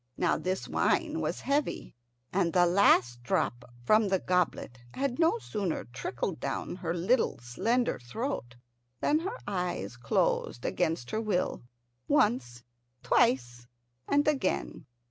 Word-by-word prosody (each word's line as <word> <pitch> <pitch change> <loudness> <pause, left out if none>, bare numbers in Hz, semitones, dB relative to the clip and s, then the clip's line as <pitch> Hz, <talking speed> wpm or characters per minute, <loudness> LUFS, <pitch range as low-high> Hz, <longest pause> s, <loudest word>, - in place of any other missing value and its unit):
Now 175 - +2
this 185 +1 -2
wine - - +1
was - - -2
heavy, 285 +1 -1 0.4
and 180 -2 +2
the 180 -1 +5
last 125 -10 +4
drop 120 -1 -1 0.2
from 215 - +4
the 190 -1 +2
goblet 180 -9 -1 0.2
had 270 -1 -1
no 335 +7 +4
sooner 205 - -3
trickled 125 +7 -4
down - - -3
her 170 -2 -3
little 215 +9 +2
slender 225 - 0
throat 125 - -4 0.4
than 305 - +2
her 390 +9 -4
eyes 180 - -3
closed 120 0 0
against 165 -8 -1
her 220 - -1
will, 205 -5 -1 0.5
once, 120 -1 +1 0.4
twice, 120 -1 +2 0.4
and 290 +1 +2
again. 275 -10 -1
180 Hz, 125 wpm, -29 LUFS, -, 0.5 s, the